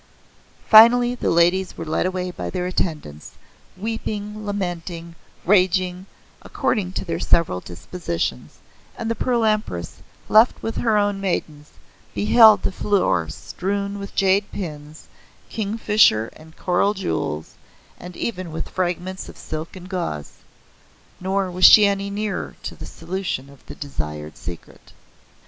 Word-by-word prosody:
Finally 240 +3 +8
the 250 - -2
ladies 175 +3 +2
were 165 - -5
led 160 +3 0
away 185 -1 -3
by - - -5
their 180 -1 -3
attendants, 155 - -3 0.4
weeping, 215 0 -4
lamenting, 175 -4 -4 0.3
raging, 185 -1 +2 0.3
according 195 -6 -1
to - - -4
their - - -3
several 160 - +2
dispositions, 85 - -5 0.4
and 230 0 -3
the - - +2
Pearl 235 0 0
Empress, 210 - -1 0.3
left 220 +3 +4
with 225 - -3
her 220 -3 +2
own 205 -1 0
maidens, 155 -6 -3 0.4
beheld 220 0 +6
the - - 0
floor 185 - +1
strewn 200 - -4
with 200 0 -8
jade 195 +1 +2
pins, 155 -5 -7 0.4
kingfisher 210 - +2
and 160 +1 -16
coral 190 +3 +1
jewels, 80 - -3 0.5
and 180 0 -10
even 185 -7 -4
with 160 - -5
fragments 185 +1 -3
of - - -12
silk 155 +3 -6
and 180 -1 -10
gauze. 170 - -4 0.8
Nor 190 0 -1
was 180 +1 +3
she 215 - +9
any 200 0 0
nearer 210 0 -3
the - - -9
solution 165 -5 -5
of 140 - -19
the - - -9
desired 75 - -6
secret. 85 -1 -10
185 Hz, 130 wpm, -22 LUFS, 160-205 Hz, 0.8 s, she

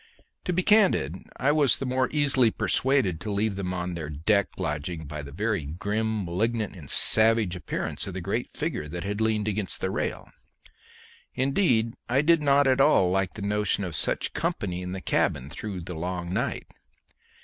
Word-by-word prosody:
To - - 0
be 185 +2 +1
candid, 185 - +3 0.2
I 140 +3 +2
was 145 -3 +3
the 135 - -4
more 130 0 0
easily 140 -5 +3
persuaded 120 - +1
to 105 - -4
leave 100 0 0
them 95 -2 -3
to 90 -1 -3
their 80 -3 -5
deck 95 +7 +1
lodging 75 +2 -3
by 75 +1 -6
the 70 -1 -9
very 100 +2 -1
grim, 105 +5 -2
malignant, 105 +5 -1
and 80 -7 -11
savage 110 -4 +5
appearance 90 +2 -4
of 95 - -6
the - - -3
great 100 +7 -3
figure 150 - -3
that 85 +3 -5
had 100 +2 -3
leaned 110 -1 +1
against 105 -2 -2
the - - -2
rail. - - -3 1.0
Indeed, 130 - +2 0.2
I 135 +4 +3
did 165 0 +4
not 140 -1 +4
at 130 0 +3
all 115 -11 +4
like 95 0 0
the 105 - -6
notion 105 0 0
of 90 -4 -4
such - - -1
company 90 0 -2
in 90 0 -5
the 95 - -5
cabin 70 -5 0
through 100 -4 -6
the 90 +2 -7
long 90 +1 -4
night. - - -2
100 Hz, 180 wpm, -26 LUFS, 90-125 Hz, 1.0 s, savage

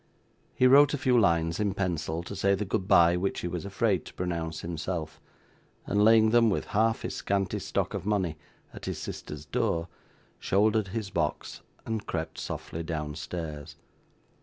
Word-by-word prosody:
He 130 - +3
wrote 145 +3 +7
a - - -3
few 130 -3 +2
lines 85 -7 +2
in 100 -2 0
pencil, 85 -3 -2
to 95 - -7
say 100 +1 +2
the 105 +2 -3
goodbye 90 -4 +4
which 95 +2 -2
he - - -2
was 90 +1 -4
afraid 100 -1 0
to - - -12
pronounce 85 -3 -3
himself, 80 -2 -4 0.6
and 100 +1 +2
laying 110 0 +6
them, 115 -1 +5
with 100 - -1
half 110 +2 +2
his - - -3
scanty 100 -2 -1
stock - - -2
of - - -3
money, 95 -6 0 0.4
at - - -9
his - - -3
sister's 75 0 -7
door, 90 -4 -1 0.5
shouldered 105 +1 +2
his 100 +1 -4
box - - -2 0.2
and 110 -2 -3
crept 80 0 -4
softly 80 - -5
downstairs. 75 -1 -5
95 Hz, 160 wpm, -28 LUFS, 85-110 Hz, 0.6 s, wrote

